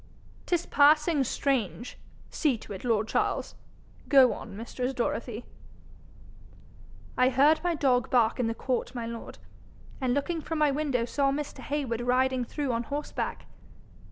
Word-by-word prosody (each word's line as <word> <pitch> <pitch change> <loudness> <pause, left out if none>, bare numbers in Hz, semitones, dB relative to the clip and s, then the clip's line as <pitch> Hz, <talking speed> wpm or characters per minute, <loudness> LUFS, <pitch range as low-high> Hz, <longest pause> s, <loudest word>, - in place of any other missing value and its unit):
''Tis 350 -1 +1
passing 300 +1 +4
strange. 245 - -2 0.3
See 280 -6 +1
to 210 - -9
it, 190 - -8
lord 220 -3 +1
Charles. - - -1 0.6
Go 265 -4 +6
on, 200 -3 -9
mistress 250 +3 -4
Dorothy.' 235 -1 -3 1.7
'I 255 0 +5
heard 285 +5 +4
my 350 -1 +1
dog 255 -5 +2
bark 235 -2 +2
in 245 - +1
the 225 - -2
court, 255 0 -2
my 235 -1 -3
lord, 230 0 -7 0.6
and 255 -1 +1
looking 320 +4 -1
from 320 +2 -4
my 300 -2 +3
window 275 -5 0
saw 275 +3 +1
Mr. 290 +1 -4
Heywood 270 -5 -2
riding 255 +1 +1
through 275 +2 -3
on 230 0 0
horseback. 290 +3 -4
260 Hz, 145 wpm, -28 LUFS, 235-290 Hz, 1.7 s, Go